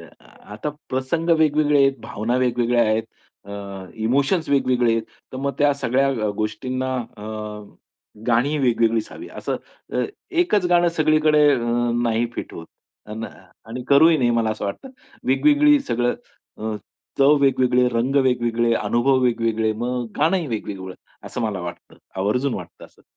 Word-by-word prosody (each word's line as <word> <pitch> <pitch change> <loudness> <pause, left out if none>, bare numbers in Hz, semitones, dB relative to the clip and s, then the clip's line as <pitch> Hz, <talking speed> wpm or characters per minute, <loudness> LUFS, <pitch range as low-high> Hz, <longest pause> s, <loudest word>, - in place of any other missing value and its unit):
अ, - - -13 0.4
आता 110 +8 -4 0.2
प्रसंग 135 +6 -1
वेगवेगळे 150 -1 +3
आहेत, 135 -1 +2
भावना 115 +4 -2
वेगवेगळ्या 120 -1 +2
आहेत. 110 0 +1 0.4
अ, 100 - -12 0.5
इमोशन्स 140 - +1
वेगवेगळे 130 -4 +2
आहेत. 115 0 0 0.3
तर - - -5
मग 140 +1 -1
त्या 145 0 +4
सगळ्या 135 0 +1
अ, 115 -6 -1
गोष्टींना 130 +5 -2 0.2
अ, 105 - -11 1.0
गाणीही 125 +6 +2
वेगवेगळीच 115 -4 +1
हवी, 345 - -9
असं - - -4 0.4
अ, - - +1 0.3
एकच 335 - +2
गाणं 175 -1 +4
सगळीकडे 155 -1 +4
अ, - - -1 0.4
नाही 115 0 +1
फिट - - -6
होत. 80 - -9 0.4
अन 110 +1 -6
आणि 120 +2 -10
करूही 160 +4 +6
नाही 120 -3 +2
मला 115 -2 +1
असं 110 -1 -4
वाटतं. 100 - -5 0.4
वेगवेगळी 295 - +4
सगळं 120 - 0 0.4
अ, 110 0 -3 0.4
चव 140 +2 +6
वेगवेगळे, 125 -2 +3
रंग 125 +3 -1
वेगवेगळे, 120 -2 +1
अनुभव 125 +4 +2
वेगवेगळे, 115 -2 +1
मग 120 +2 -3
गाणंही 165 +3 +1
वेगवेगळं 100 -6 -5 0.3
असं - - -5
मला 105 -5 -2
वाटतं, 85 0 -9 0.2
आवर्जून 125 +7 0
वाटतं 90 -2 -9
असं. - - -20
125 Hz, 145 wpm, -22 LUFS, 115-145 Hz, 1.0 s, करूही